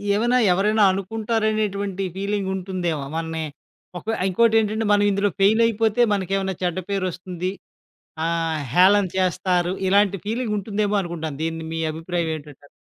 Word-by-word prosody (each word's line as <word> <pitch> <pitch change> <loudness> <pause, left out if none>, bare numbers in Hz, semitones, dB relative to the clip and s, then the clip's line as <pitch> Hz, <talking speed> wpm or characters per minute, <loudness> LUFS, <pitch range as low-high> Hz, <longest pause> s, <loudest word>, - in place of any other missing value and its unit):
ఏవైనా 240 +4 +2 0.2
ఎవరైనా 210 +3 +2
అనుకుంటారనేటువంటి 210 -1 -1
ఫీలింగుంటుందేమో 190 -5 -2
మన్ని 160 0 -3 0.6
ఒక - - -19 0.2
ఇంకోటేంటంటే 220 +2 +2
మనం 205 0 +4
ఇందులో 200 +1 +1
ఫెయిలయిపోతే 220 +2 +3
మనకేమన్నా 195 -1 -1
చెడ్డ 175 -1 -1
పేరొస్తుంది, 185 -2 -3 0.7
ఆహ్, 165 -1 -1
హేళన 195 +4 +5
చేస్తారు, 180 -1 +1
ఇలాంటి 200 +1 +3
ఫీలింగుంటుందేమో 210 -2 -1
అనుకుంటాను. 160 -5 -5
దీన్ని 165 0 -3
మీ 165 - -3
అభిప్రాయం 165 +1 -2
ఏంటంటారు? 145 -2 -12
195 Hz, 110 wpm, -23 LUFS, 175-210 Hz, 0.7 s, హేళన